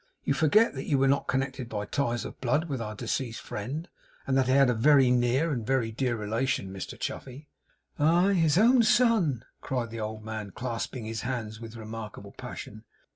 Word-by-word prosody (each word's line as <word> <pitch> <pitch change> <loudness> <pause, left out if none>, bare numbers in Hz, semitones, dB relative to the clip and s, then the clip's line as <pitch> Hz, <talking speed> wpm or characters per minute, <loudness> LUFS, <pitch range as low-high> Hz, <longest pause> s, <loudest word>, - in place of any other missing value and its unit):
You - - +1
forget 210 +9 +4
that 135 -1 -6
you 140 - +2
were 135 0 +3
not 140 +1 +2
connected 130 -2 -2
by 105 -2 -3
ties 120 0 -1
of - - -9
blood 150 +7 +1
with 135 -6 -3
our 110 -1 -5
deceased 120 +1 -3
friend; 140 - -5 0.4
and 135 - 0
that 135 -1 +3
he 130 - +3
had 135 0 +6
a 125 - +3
very 130 +2 +5
near 125 +6 +2
and 120 -5 -2
very 125 -2 0
dear 120 +1 -1
relation, 110 -2 -1
Mr 95 - -7
Chuffey.' 135 +3 -6 0.5
'Aye, 175 +6 +4
his 165 -4 +3
own 240 +4 +6
son!' 215 - +3 0.2
cried 125 -4 -2
the 115 - -6
old 110 0 -5
man, 110 -3 -5
clasping 120 -1 -4
his 110 0 -4
hands 115 -4 -4
with 115 0 -9
remarkable 110 -2 -8
passion. 110 +2 -8
125 Hz, 190 wpm, -28 LUFS, 110-140 Hz, 0.5 s, had